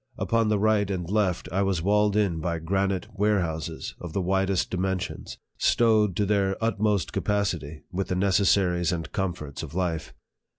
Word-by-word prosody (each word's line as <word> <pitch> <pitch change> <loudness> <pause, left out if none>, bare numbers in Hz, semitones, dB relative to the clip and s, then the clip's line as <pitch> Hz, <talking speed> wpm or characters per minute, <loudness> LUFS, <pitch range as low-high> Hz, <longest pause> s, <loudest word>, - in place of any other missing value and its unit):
Upon 115 -1 +1
the 105 - +2
right 105 -1 +2
and 90 -4 -3
left, 95 -3 0
I 95 +3 +1
was 95 -4 0
walled 105 +1 +3
in 100 -6 +1
by 85 0 -2
granite 95 +3 -1
warehouses 95 -6 -1
of 85 -3 -7
the 100 - 0
widest 95 +1 +1
dimensions, 95 0 -3 0.2
stowed 110 -5 +3
to 105 - +1
their 100 -1 +1
utmost 105 -5 0
capacity 85 -8 -1
with 95 +1 -2
the 90 - -1
necessaries 90 -2 +2
and 80 -3 -4
comforts 85 -7 -3
of - - -8
life. 85 -4 -2
95 Hz, 160 wpm, -26 LUFS, 85-105 Hz, 0.2 s, walled